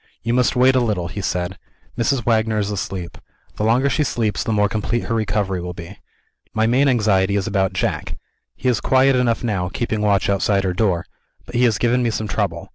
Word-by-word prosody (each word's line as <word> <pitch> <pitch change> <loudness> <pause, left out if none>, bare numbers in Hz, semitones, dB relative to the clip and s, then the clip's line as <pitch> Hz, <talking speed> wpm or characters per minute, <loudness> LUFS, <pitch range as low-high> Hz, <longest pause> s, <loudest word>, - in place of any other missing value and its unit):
"You 115 - 0
must 125 +1 +2
wait 130 +1 +5
a - - +4
little," 105 -8 -1
he 100 - -5
said. 90 -1 -3 0.4
"Mrs. 120 +1 0
Wagner 110 -1 +1
is 105 -1 -1
asleep. 95 -3 -5 0.4
The - - -2
longer 120 +5 +3
she 150 +2 +1
sleeps 110 -6 -1
the - - -2
more 105 -1 +3
complete 110 +3 -2
her - - -3
recovery 105 -4 -1
will 90 0 -6
be. 85 +4 -10 0.6
My 110 0 +2
main 130 +5 +3
anxiety 105 -6 +2
is 100 -2 0
about 95 -3 0
Jack. 75 -5 -2 0.4
He - - -4
is 120 -5 +2
quiet 130 +1 +3
enough 125 -2 +1
now, 95 -6 -1
keeping 110 +1 -2
watch 100 -2 +2
outside 100 0 +1
her 95 -1 0
door; 90 -4 0 0.4
but 120 - -12
he 125 +1 +3
has 110 -4 +2
given 120 +4 +1
me 120 - +1
some 110 -1 -3
trouble. 95 -6 -2
110 Hz, 210 wpm, -20 LUFS, 95-120 Hz, 0.6 s, wait